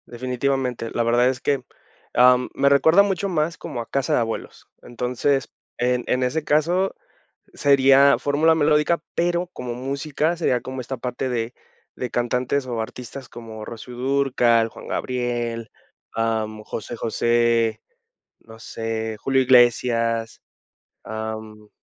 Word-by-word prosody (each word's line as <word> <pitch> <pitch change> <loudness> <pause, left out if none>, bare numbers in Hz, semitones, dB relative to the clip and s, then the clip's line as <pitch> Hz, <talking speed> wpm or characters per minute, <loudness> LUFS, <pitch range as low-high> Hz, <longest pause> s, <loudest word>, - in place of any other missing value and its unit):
Definitivamente. 125 -1 -2
La 120 - +1
verdad 120 +2 +3
es 130 -1 -3
que, 140 -3 0 0.5
am, 125 0 +5
me 140 - +3
recuerda 160 +7 +6
mucho 200 0 -1
más 165 -1 -1
como 120 - -5
a 115 - -10
casa 135 -2 0
de - - +3
abuelos. 115 -1 -5
Entonces, 125 +3 -1 0.3
en 125 0 +1
en 125 0 +1
ese 140 +5 -1
caso 170 +6 +1 0.6
sería 140 0 +5
fórmula 155 +3 +2
melódica, 150 +1 +2
pero 175 +1 0
como 125 -8 -6
música 140 +5 -1
sería 130 -8 0
como 130 +1 -6
esta 130 +2 -5
parte 125 +2 -3
de 120 -1 -2 0.4
de 125 - -3
cantantes 125 +3 -1
o 120 -3 -3
artistas 125 +3 -8
como 110 -2 -9
Rocío 115 +3 -9
Dúrcal, 125 -3 +2
Juan - - -12
Gabriel, 120 -3 -2 0.4
am, 110 -1 -1
José 115 +2 -6
José, 115 0 +1 0.6
no 110 0 -15
sé, 110 -1 -4
Julio 135 +4 +1
Iglesias. 115 -2 +3 0.6
Am 110 -1 -7
125 Hz, 130 wpm, -23 LUFS, 115-140 Hz, 0.6 s, recuerda